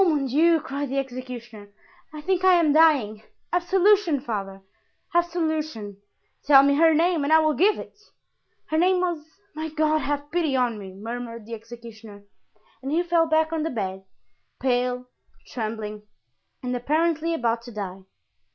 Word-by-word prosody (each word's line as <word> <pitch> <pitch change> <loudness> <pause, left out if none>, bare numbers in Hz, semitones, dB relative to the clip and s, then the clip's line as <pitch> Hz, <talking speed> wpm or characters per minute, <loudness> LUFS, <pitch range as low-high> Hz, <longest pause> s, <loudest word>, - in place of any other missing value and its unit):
"Oh, 370 - +3
mon 295 -4 +1
Dieu!" 320 +6 +3
cried 285 -2 -4
the 275 - -2
executioner, 245 -5 -6 0.4
"I 305 -1 -8
think 370 +2 0
I 375 -1 +6
am 325 -4 +3
dying. 280 -10 +4 0.3
Absolution, 360 -2 +3
father! 195 -6 -5 0.5
absolution." 315 - -1 0.5
"Tell 275 -2 +7
me 280 0 +4
her 325 +3 +5
name 335 -1 +2
and 285 - -1
I 320 - +8
will 310 -1 +3
give 395 +8 +3
it." - - -10 0.7
"Her 315 - +2
name 365 +1 +3
was——My 340 0 -5
God, 310 0 +1
have 290 +1 -3
pity 330 -5 0
on 245 -4 0
me!" 190 -2 -10
murmured 230 +1 -7
the 230 - -9
executioner; 225 -2 -11 0.6
and 270 +1 -5
he 335 +3 +2
fell 340 -1 +2
back 315 0 +1
on 320 - -1
the 320 - -1
bed, 190 -6 -4 0.6
pale, 250 -1 0 0.4
trembling, 215 -2 -5 0.6
and 250 0 -2
apparently 320 +5 0
about 235 -4 0
to 240 - -9
die. 195 -3 -6
285 Hz, 155 wpm, -24 LUFS, 230-325 Hz, 0.7 s, I